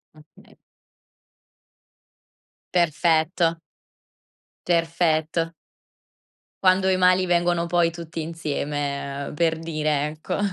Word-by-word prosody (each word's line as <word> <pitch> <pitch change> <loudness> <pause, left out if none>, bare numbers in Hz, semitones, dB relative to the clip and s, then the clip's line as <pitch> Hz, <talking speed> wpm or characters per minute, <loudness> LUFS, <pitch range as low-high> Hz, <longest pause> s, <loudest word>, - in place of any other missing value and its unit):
Okay. 155 0 -20 2.2
Perfetto. 165 0 +2 1.1
Perfetto. 165 -1 +1 1.1
Quando 185 +1 +4
i 190 - +3
mali 185 0 +4
vengono 175 -1 +1
poi 170 -1 +2
tutti 165 -1 -6
insieme, 145 -3 -3
ehm, - - -7
per 160 +1 +1
dire, 155 -3 -1
ecco. 155 0 -5
165 Hz, 80 wpm, -24 LUFS, 155-175 Hz, 2.2 s, Quando